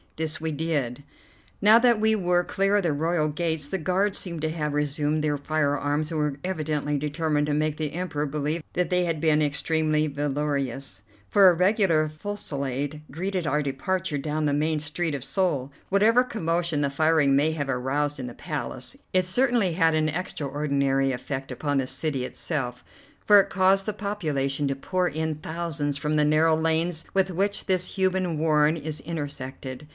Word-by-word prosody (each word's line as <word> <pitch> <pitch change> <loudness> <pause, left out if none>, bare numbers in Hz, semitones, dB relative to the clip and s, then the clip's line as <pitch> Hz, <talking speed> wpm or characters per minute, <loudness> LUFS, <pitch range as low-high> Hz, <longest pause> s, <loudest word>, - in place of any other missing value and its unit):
This 155 -1 -3
we 160 0 -2
did. 145 -4 -2 0.6
Now 215 +2 +8
that 235 -2 +4
we 220 0 +3
were 180 -3 +2
clear 195 +3 +1
of 205 - +2
the 165 -4 +1
royal 160 +1 +1
gates, 160 -1 -2
the 190 +6 -2
guards 185 +4 +1
seemed 170 -4 -5
to 160 - +1
have 150 -2 -2
resumed 150 +1 0
their 145 -1 +1
firearms 145 +1 0
and 160 - -1
were 150 -2 0
evidently 150 -5 -1
determined 150 0 0
to 150 - 0
make 155 0 0
the 155 -2 -3
Emperor 155 -4 -2
believe 150 +3 -2
that 180 +1 -1
they 180 0 +2
had 165 -3 -1
been 155 -2 +3
extremely 155 +1 +1
valorous, 140 -6 -2 0.3
for 195 -2 +7
a - - +4
regular 180 -3 +3
fusillade 150 -5 -4
greeted 180 +3 -3
our 150 +1 +1
departure 150 +4 -2
down 150 +2 -2
the 145 - +1
main 155 +2 +1
street 155 +1 -2
of 135 - -5
Seoul. 145 -7 0 0.2
Whatever 220 +5 +4
commotion 170 -9 -1
the 140 -1 0
firing 155 -1 +3
may 150 +3 +3
have 145 -3 -3
aroused 140 +3 -1
in 125 - -4
the 120 - -8
Palace, - - -5 0.2
it 185 -1 +3
certainly 235 -2 +2
had 165 -2 +3
an 155 0 +2
extraordinary 140 -5 0
effect 135 +1 -5
upon 145 +3 -1
the 130 - -1
city 130 0 -2
itself, 125 -5 -4 0.4
for 205 -1 +8
it 195 - +2
caused 190 +1 +3
the 215 - 0
population 150 -9 -1
to 135 - -1
pour 180 +6 -1
in 160 0 -2
thousands 155 -2 -3
from 150 +2 -1
the 150 0 +3
narrow 155 +2 +4
lanes 160 +1 0
with 190 -1 +2
which 200 +3 -1
this 185 -1 0
human 185 -3 +1
warren 155 0 +3
is 155 -1 -4
intersected. 140 -3 -6
155 Hz, 175 wpm, -25 LUFS, 145-175 Hz, 0.6 s, Now